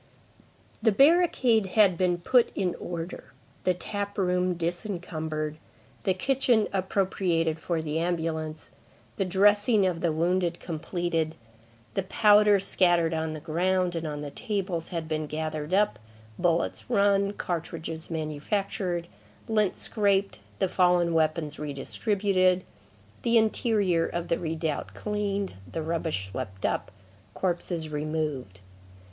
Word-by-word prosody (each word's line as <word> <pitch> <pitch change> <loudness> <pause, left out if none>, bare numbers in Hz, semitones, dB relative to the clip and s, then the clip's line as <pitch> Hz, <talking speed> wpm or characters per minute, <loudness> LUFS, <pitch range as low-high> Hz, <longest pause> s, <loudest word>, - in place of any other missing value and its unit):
The 220 0 +4
barricade 270 - +4
had 200 -4 +6
been 175 0 +1
put 235 +8 +3
in 180 -3 0
order, 170 +1 -6 0.3
the 185 - +3
tap 200 +2 -4
room 180 -1 +1
disencumbered, 165 -4 -3 0.5
the 190 - +2
kitchen 245 0 +2
appropriated 185 -4 0
for 165 0 -2
the 155 +1 -1
ambulance, 160 -2 -2 0.5
the 195 - +1
dressing 205 +3 +4
of 175 -3 -1
the 170 - +2
wounded 175 +2 0
completed, 165 -1 -2 0.6
the 195 - 0
powder 210 +1 +5
scattered 175 -3 +3
on 160 0 -2
the 155 - -6
ground 180 +3 0
and 165 -1 -3
on 145 -1 -4
the 145 -1 -6
tables 195 - -3
had 165 -3 -4
been 155 -1 -2
gathered 155 0 -4
up, 205 +2 +2 0.4
bullets 170 +4 0
run, 200 -3 +3
cartridges 165 -3 -5
manufactured, 170 +3 -2 0.4
lint 215 -3 +1
scraped, 200 -2 +1 0.2
the 190 - +1
fallen 180 -2 +3
weapons 155 -1 0
re 150 -1 -4
distributed, 185 +3 +1 0.6
the 235 0 +3
interior 210 -6 +2
of 170 0 -4
the 170 - +1
redoubt 160 -2 -3
cleaned, 205 -2 -2 0.2
the 160 - -3
rubbish 160 - -2
swept 95 -4 -5
up, - - -1 0.5
corpses 175 -3 -2
removed. 150 - -3
175 Hz, 125 wpm, -27 LUFS, 160-200 Hz, 0.6 s, had